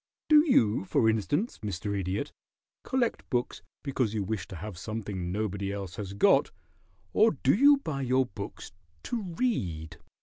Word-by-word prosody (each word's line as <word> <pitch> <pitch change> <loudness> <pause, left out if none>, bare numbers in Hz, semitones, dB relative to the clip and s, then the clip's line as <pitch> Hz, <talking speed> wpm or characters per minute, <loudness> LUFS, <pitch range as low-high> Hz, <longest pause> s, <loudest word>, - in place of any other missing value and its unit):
Do 305 -1 +8
you, 110 - +4
for 110 - +2
instance, 145 - -1
Mr. 100 0 -3
Idiot, 100 - -2 0.5
collect 255 -3 -1
books 125 -3 -1 0.2
because 130 -6 -1
you 105 - 0
wish 95 -2 -3
to 95 - -8
have 100 +3 -7
something 95 -2 -4
nobody 100 -1 -2
else 100 -3 -6
has 100 -2 -5
got, 100 - +4 0.6
or 220 +1 +5
do 135 - +5
you 285 +7 +6
buy 155 - -4
your 130 0 +2
books 100 -3 -8 0.3
to 240 -2 -2
read?" 95 - -2
110 Hz, 155 wpm, -29 LUFS, 95-145 Hz, 0.6 s, Do